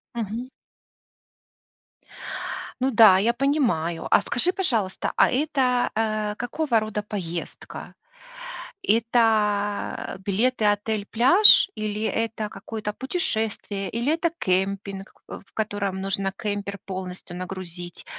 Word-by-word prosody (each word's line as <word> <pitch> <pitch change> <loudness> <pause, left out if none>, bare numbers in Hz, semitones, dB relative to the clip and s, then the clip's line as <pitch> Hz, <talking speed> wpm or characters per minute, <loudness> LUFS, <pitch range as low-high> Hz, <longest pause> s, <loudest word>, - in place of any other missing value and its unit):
Мгм. 230 +3 -4 2.3
Ну 260 +1 +1
да, 215 -5 +7
я 230 +5 +2
понимаю. 235 - 0
А - - +5
скажи, 325 +10 +1
пожалуйста, 225 - -1
а - - +5
это, 260 -3 +1
э, 215 -1 -1
какого 245 0 0
рода 215 -1 -4
поездка? 175 -5 -6 0.9
Это 215 -4 +1
билеты-отель-пляж? 220 - +5
Или 215 0 -3
это 225 -1 -2
какое-то 215 -2 -6
путешествие? 220 - -2
Или 240 +7 0
это 335 +1 +1
кемпинг, 195 +1 -2 0.2
э, - - -7
в - - -33
котором 200 -3 -2
нужно 195 0 -1
кемпер 200 -1 -3
полностью 185 -1 -6
нагрузить 180 -1 -7
215 Hz, 100 wpm, -24 LUFS, 195-235 Hz, 2.3 s, да